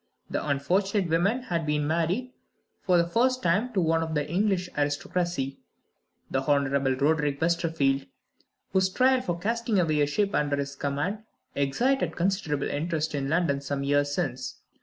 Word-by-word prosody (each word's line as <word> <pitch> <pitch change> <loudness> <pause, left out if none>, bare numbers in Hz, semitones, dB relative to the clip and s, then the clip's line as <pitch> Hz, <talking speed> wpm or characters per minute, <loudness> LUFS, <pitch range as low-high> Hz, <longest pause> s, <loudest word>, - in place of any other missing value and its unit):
The - - -1
unfortunate 180 +6 0
woman 200 +10 +2
had 170 -8 -2
been 150 -1 0
married, 170 - -1 0.5
for 180 -1 +3
the 170 - +3
first 255 +8 +1
time, 210 +9 +2
to 200 - +1
one 165 0 +2
of 160 -1 -3
the 150 -1 0
English 185 +2 +1
aristocracy 145 0 -1 0.7
the 130 - +1
Honorable 140 -1 +1
Roderick 145 0 +1
Westerfield 160 - +1 0.7
whose 190 -1 +3
trial 255 +5 +3
for 175 -8 -2
casting 225 +2 0
away 155 -4 +2
a 145 - +3
ship 200 +7 0
under 145 -1 +1
his 140 0 -4
command 145 +9 -2 0.3
excited 240 - +1
considerable 175 -5 0
interest 160 +1 -2
in 140 -1 -2
London 155 -4 +1
some 140 0 -3
years 145 0 +2
since. 130 -2 -3
160 Hz, 155 wpm, -27 LUFS, 145-190 Hz, 0.7 s, for